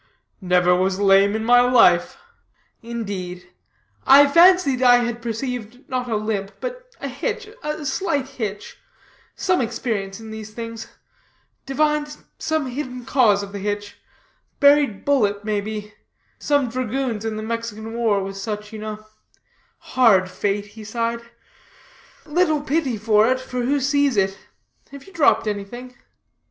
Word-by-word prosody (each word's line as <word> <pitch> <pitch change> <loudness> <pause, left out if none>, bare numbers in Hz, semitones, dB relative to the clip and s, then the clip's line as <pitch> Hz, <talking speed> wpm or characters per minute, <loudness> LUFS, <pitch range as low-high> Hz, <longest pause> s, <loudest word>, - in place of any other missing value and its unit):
"Never 180 -1 +3
was 185 +1 0
lame 200 +1 +4
in 220 0 -2
my 245 +1 +6
life." 230 -9 +4 0.6
"Indeed? 195 -6 -6 0.6
I 280 +2 +8
fancied 335 -3 +5
I 245 -1 +7
had 240 0 -4
perceived 245 +1 -5
not 250 -1 -3
a 225 - 0
limp, 210 -2 -3
but - - -7
a - - -4
hitch, 435 - -4
a 300 0 -4
slight 280 -1 -1
hitch; 220 -7 -6 0.6
some 365 -4 +1
experience 225 -4 -3
in 220 -1 -10
these 215 -1 -9
things 230 -1 -7 0.8
divined 300 +1 0 0.2
some 315 -2 -1
hidden 255 -1 -6
cause 225 -7 +3
of 200 - -8
the 200 - -6
hitch 205 +1 -4 0.6
buried 285 -7 +4
bullet, 210 -8 +1
may 210 -2 0
be 210 0 -6 0.5
some 285 -3 +1
dragoons 250 -2 -3
in 220 -1 -3
the 215 - -5
Mexican 225 -1 -5
war 230 -3 +1
discharged - - -4
with 195 0 -7
such, 210 +1 -5
you 215 - -7
know. 215 0 -7 0.9
Hard 200 -8 +4
fate!" 200 +2 -2
he 210 +1 -12
sighed, 230 +2 -2 1.0
"little 315 -1 +1
pity 285 -4 -1
for 215 0 +3
it, 255 - +1
for 250 -1 -5
who 280 +4 +1
sees 280 -2 +1
it? 195 0 +1 0.6
have 280 -1 -10
you 390 - -17
dropped 315 -7 +3
anything?" 220 +5 -6
230 Hz, 145 wpm, -22 LUFS, 210-270 Hz, 1.0 s, I